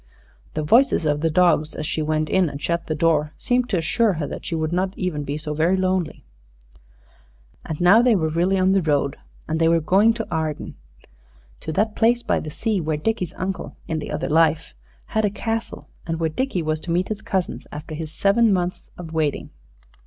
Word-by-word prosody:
The 155 - -1
voices 235 - +4
of 150 -1 +1
the 165 - +2
dogs, 160 -2 +2
as 155 - -4
she 155 - -2
went 155 0 0
in 185 -1 +2
and 140 - -7
shut 170 +3 -2
the 155 - -1
door, 155 -1 +1
seemed 245 0 0
to 195 - +1
assure 200 +6 +2
her 155 -3 -3
that - - -7
she 165 - -2
would 160 +1 -1
not 185 +2 -1
even 175 -6 -2
be 145 +1 -3
so 150 0 -4
very 165 +5 +2
lonely. 185 - -1 1.4
And 155 - -5
now 180 +6 +6
they 240 -2 +4
were 160 -4 +1
really 175 +4 +1
on 185 0 +3
the 195 0 +3
road. 145 -3 +1 0.3
And 160 +1 -1
they 165 - +4
were 165 0 +4
going 195 +8 +3
to 225 -1 -4
Arden 160 -2 -3 0.9
to 160 - -5
that 215 +5 0
place 240 +2 +3
by - - +1
the 155 - -6
sea 210 +5 -1
where 155 -1 -1
Dickie's 185 +1 -2
uncle, 185 -6 -4
in 160 - -2
the 150 - -6
other 150 0 -2
life, 160 - +2 0.3
had 220 - -1
a 210 - +3
castle, 225 +2 -4 0.2
and 165 -1 -2
where 165 -1 +1
Dickie 190 -2 -1
was 155 0 -1
to 170 - -5
meet 180 +2 0
his 215 -1 -4
cousins, 190 -2 -3
after 150 +2 -7
his 155 0 -5
seven 210 +6 +3
months 180 -1 -2
of 165 -2 -8
waiting. 155 -3 -1
165 Hz, 210 wpm, -22 LUFS, 155-195 Hz, 1.4 s, now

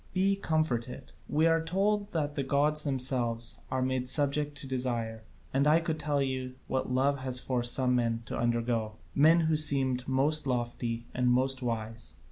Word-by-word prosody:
Be 195 +1 +3
comforted; 140 -9 -2 0.2
we 155 +2 +2
are 165 0 +3
told 200 +4 0
that 150 -3 -1
the 145 - -2
gods 145 +3 +1
themselves 125 -4 -1
are 130 0 -1
made 130 -1 0
subject 145 0 +2
to 140 - -6
desire, 120 -4 -2 0.3
and 140 +2 +2
I 155 +2 +5
could 160 -1 -3
tell 145 -1 0
you 130 -1 -3
what 130 -1 -2
love 135 +2 +1
has 130 -1 -2
forced 120 -2 +1
some 125 -1 +2
men 115 -1 -1
to - - -5
undergo, 115 -2 -1 0.2
men 160 +4 +5
who 160 -1 +2
seemed 135 -4 +1
most 140 +3 +2
lofty 120 -2 -2
and 125 0 +1
most 130 +2 +1
wise. 115 -2 -4
130 Hz, 170 wpm, -30 LUFS, 125-150 Hz, 0.3 s, I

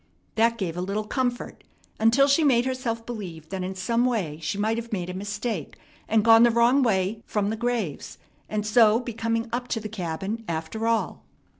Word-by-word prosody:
That 230 +1 +2
gave 180 -6 -3
a 180 - -3
little 200 +3 -2
comfort 245 +3 -3 0.4
until 235 +5 +5
she 285 +3 +3
made 250 -4 +4
herself 250 -3 -3
believe 175 -9 -7
that 190 -1 -4
in 190 +1 -4
some 230 +6 0
way 195 -12 -1
she 155 +5 -3
might 220 +2 0
have 230 0 -6
made 180 -4 -3
a - - -7
mistake 205 - -4 0.3
and 220 0 +2
gone 225 0 +8
the 240 - +7
wrong 235 +4 +4
way 210 -2 +1
from 205 -1 0
the - - -2
graves, 230 -9 -3 0.3
and 210 -1 -2
so 220 0 +5
be 245 -2 -6
coming 230 +1 -1
up 245 +1 -2
to 230 - -1
the 215 - -6
cabin 195 +3 -4
after 165 +8 -3
all. 230 -1 -1
225 Hz, 195 wpm, -25 LUFS, 195-235 Hz, 0.4 s, gone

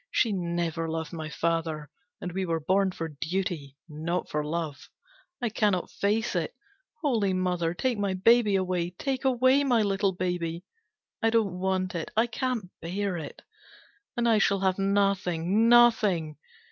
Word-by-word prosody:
She 230 - +2
never 170 -2 -2
loved 160 -1 -4
my 160 -2 -5
father, 160 -2 -2 0.3
and 180 - -5
we 190 +2 -2
were 165 -3 -1
born 190 +5 +2
for 165 -2 -4
duty, 155 -2 -3
not 165 +3 -3
for 150 0 0
love. 155 -1 -4 0.5
I 240 - +1
cannot 205 -4 0
face 215 +3 0
it. - - -2 0.5
Holy 220 -9 +2
Mother, 180 -2 0
take 245 +3 -1
my 200 -2 0
baby 215 +1 +4
away! 180 -2 0
Take 270 -1 -2
away 260 +2 +4
my 245 -5 +3
little 195 -1 +1
baby! 175 -2 -2 0.6
I 225 - +3
don't 215 -6 +1
want 185 -1 0
it, 170 -2 -4
I 225 - +5
can't 240 -6 -3
bear 190 +3 -2
it! 155 -4 -7 0.7
And 235 0 +2
I 225 -2 +4
shall 200 -2 +2
have 190 0 +1
nothing, 195 0 +2
nothing! 210 -10 +4
185 Hz, 155 wpm, -27 LUFS, 165-215 Hz, 0.7 s, I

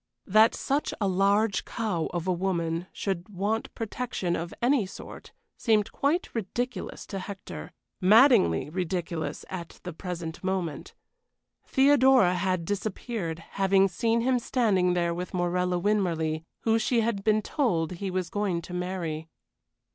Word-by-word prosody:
That 215 +3 +5
such 280 +2 -1
a 200 - +1
large 200 +2 +2
cow 205 -8 -2
of 175 0 -4
a - - +3
woman 170 -2 -1
should 190 -1 -3
want 210 +3 -2
protection 225 -6 -2
of 170 +1 -4
any 245 -4 +2
sort - - -10 0.3
seemed 215 -3 +2
quite 300 +6 0
ridiculous 240 +3 -4
to 195 - -5
Hector 185 - -7 0.3
maddeningly 190 - +5
ridiculous 175 -2 -3
at 175 -3 -7
the 180 - -5
present 170 -1 -6
moment. 185 -5 -3 0.7
Theodora 265 -7 +5
had 185 -1 0
disappeared, 200 -3 -3
having 195 0 +3
seen 225 +5 +1
him 250 +1 +2
standing 195 -8 +2
there 170 -1 +1
with 180 +2 -5
Morella 180 0 +1
Winmarleigh, 170 -5 0 0.2
who 225 0 +2
she 230 +1 +2
had 215 -3 -1
been 215 0 +3
told 180 - 0
he 190 +2 -4
was 185 -2 -2
going 195 -5 -1
to 180 - -9
marry. 175 -3 -3
190 Hz, 140 wpm, -27 LUFS, 175-220 Hz, 0.7 s, That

